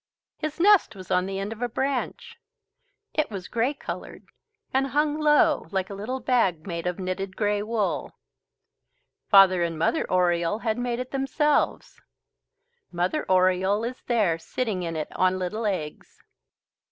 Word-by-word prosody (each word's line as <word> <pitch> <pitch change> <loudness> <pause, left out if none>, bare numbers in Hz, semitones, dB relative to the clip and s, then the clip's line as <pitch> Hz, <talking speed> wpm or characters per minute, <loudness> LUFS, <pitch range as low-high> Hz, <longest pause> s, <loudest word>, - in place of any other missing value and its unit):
His 310 0 -4
nest 390 - +5
was 185 -2 -10
on 180 +1 +2
the 195 0 -4
end 200 +3 -3
of 225 - -14
a 245 - -1
branch. 275 - -3 0.8
It 305 - 0
was 195 -4 -6
grey 245 +5 0
coloured - - -7 0.5
and 270 +1 +2
hung 295 +2 0
low 300 0 +3
like 190 -1 -2
a - - -4
little 220 +7 -4
bag, 225 -11 +1
made 170 -2 -4
of 180 - -2
knitted 190 0 -4
grey 205 -1 +1
wool. 215 -1 -2 1.1
Father 195 -3 +7
and 165 -1 -1
Mother 165 - 0
Oriole 175 +1 +2
had 220 +1 0
made 245 -1 -1
it 255 +1 -5
themselves. 280 +2 0 0.9
Mother 180 - -1
Oriole 185 +3 +3
is 250 +2 -5
there 205 -9 +2
sitting 215 +2 -3
in 165 -2 -3
it 155 -1 -5
on 185 0 +2
little 210 +5 -2
eggs. 155 -7 -5
205 Hz, 150 wpm, -25 LUFS, 185-255 Hz, 1.1 s, Father